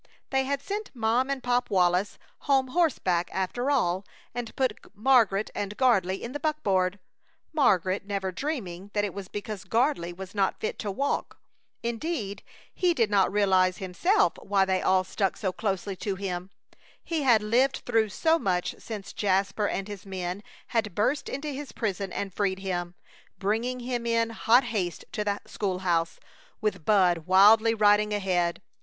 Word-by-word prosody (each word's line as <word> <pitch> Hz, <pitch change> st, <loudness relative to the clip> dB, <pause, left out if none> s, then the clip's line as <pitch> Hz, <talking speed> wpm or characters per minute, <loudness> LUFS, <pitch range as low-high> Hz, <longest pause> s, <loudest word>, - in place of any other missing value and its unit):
They 265 Hz, -1 st, +2 dB
had 280 Hz, +1 st, -2 dB
sent 415 Hz, +1 st, -4 dB
Mom 235 Hz, +3 st, +1 dB
and 275 Hz, -2 st, -2 dB
Pop 245 Hz, 0 st, +1 dB
Wallis 180 Hz, +1 st, +2 dB, 0.2 s
home 270 Hz, -2 st, +2 dB
horseback, 225 Hz, -, +1 dB
after 190 Hz, +8 st, -1 dB
all, 190 Hz, -10 st, +1 dB, 0.3 s
and 240 Hz, -2 st, -5 dB
put 260 Hz, -5 st, 0 dB, 0.2 s
Margaret 220 Hz, -3 st, +3 dB
and 205 Hz, 0 st, -4 dB
Gardley 195 Hz, -8 st, +2 dB
in 235 Hz, -, -5 dB
the 290 Hz, -, -4 dB
buckboard, 200 Hz, -, 0 dB, 0.6 s
Margaret 195 Hz, -, +2 dB
never 195 Hz, -2 st, -2 dB
dreaming 200 Hz, -, -4 dB
that 205 Hz, 0 st, +2 dB
it 200 Hz, -, -5 dB
was 200 Hz, -1 st, -7 dB
because 205 Hz, 0 st, -6 dB
Gardley 225 Hz, -, +1 dB
was 185 Hz, +2 st, -9 dB
not 195 Hz, -2 st, 0 dB
fit -, -, -3 dB
to 210 Hz, -, -3 dB
walk. 275 Hz, +9 st, -2 dB, 0.5 s
Indeed, 235 Hz, -4 st, -3 dB, 0.3 s
he 355 Hz, -2 st, +2 dB
did 225 Hz, -6 st, +1 dB
not 195 Hz, -2 st, +3 dB
realize 190 Hz, -3 st, +3 dB
himself 345 Hz, -, +2 dB
why 195 Hz, -1 st, +2 dB
they 190 Hz, -1 st, 0 dB
all 185 Hz, 0 st, +3 dB
stuck 190 Hz, +1 st, -1 dB
so 190 Hz, -3 st, -1 dB
closely 195 Hz, -2 st, -2 dB
to 200 Hz, 0 st, -2 dB
him. 185 Hz, -1 st, -4 dB, 0.5 s
He 330 Hz, -3 st, -2 dB
had 235 Hz, -6 st, +4 dB
lived 250 Hz, +6 st, +2 dB
through 225 Hz, -3 st, +2 dB
so 320 Hz, +11 st, +2 dB
much 180 Hz, -, 0 dB
since 210 Hz, -3 st, -7 dB
Jasper 195 Hz, +1 st, +1 dB
and 195 Hz, +1 st, -3 dB
his 205 Hz, -3 st, -8 dB
men 185 Hz, 0 st, -4 dB, 0.3 s
had 220 Hz, -6 st, -1 dB
burst 260 Hz, +8 st, 0 dB
into 290 Hz, +3 st, -4 dB
his 280 Hz, -3 st, -6 dB
prison 195 Hz, -3 st, -2 dB
and 195 Hz, -2 st, -4 dB
freed 195 Hz, -2 st, 0 dB
him, 175 Hz, -2 st, -3 dB, 0.4 s
bringing 230 Hz, +5 st, -1 dB
him 240 Hz, -1 st, -3 dB
in 230 Hz, 0 st, +1 dB
hot 235 Hz, +3 st, +4 dB
haste 180 Hz, -7 st, -3 dB
to 210 Hz, -, -2 dB
the 205 Hz, -1 st, -2 dB
school 195 Hz, -3 st, -2 dB
house, 170 Hz, -2 st, +1 dB, 0.4 s
with 195 Hz, -7 st, -2 dB
Bud 180 Hz, -5 st, +3 dB
wildly 215 Hz, +4 st, +6 dB
riding 210 Hz, 0 st, +4 dB
ahead. 180 Hz, -3 st, 0 dB
205 Hz, 165 wpm, -27 LUFS, 190-245 Hz, 0.6 s, wildly